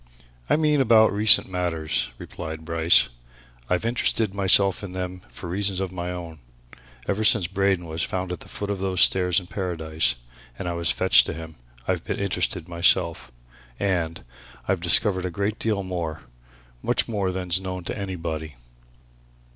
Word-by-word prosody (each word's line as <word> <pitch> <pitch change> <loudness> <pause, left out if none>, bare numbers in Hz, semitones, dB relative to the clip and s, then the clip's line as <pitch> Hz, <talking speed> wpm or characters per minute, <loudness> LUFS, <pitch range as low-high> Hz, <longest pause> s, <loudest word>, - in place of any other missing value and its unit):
"I - - +4
mean 150 -2 +2
about 110 -4 +5
recent 105 0 +5
matters," 85 -4 -2
replied 80 0 -8
Bryce. 85 0 +4 0.6
"I've 90 +4 0
interested 115 -3 0
myself 100 0 +4
in 95 -2 -7
them 90 0 -5
for - - -9
reasons 95 +1 0
of 95 -2 -3
my 90 -1 -5
own. 85 -3 -8 0.7
Ever 100 +2 -1
since 105 -3 +5
Braden 95 -1 0
was 80 0 -4
found 95 -2 -3
at 90 - -5
the - - -10
foot 100 0 -4
of 100 - -3
those 95 -1 -1
stairs 90 -1 +4
in 90 - -12
Paradise, 80 -8 -1 0.4
and - - -5
I 85 - -2
was 85 -1 0
fetched - - +4
to - - -3
him, 80 -1 -9 0.3
I've 90 -2 0
interested 100 -2 -2
myself. 85 -5 +2 0.5
And 85 -4 -1 0.4
I've 95 -2 0
discovered 95 +2 +4
a - - -1
great 100 +4 -3
deal 105 -3 -1
more, 85 -4 -5 0.6
much - - +1
more 100 -5 -1
than's 90 0 0
known 90 -1 -5
to - - -4
anybody." 80 - -5
90 Hz, 160 wpm, -24 LUFS, 85-100 Hz, 0.7 s, about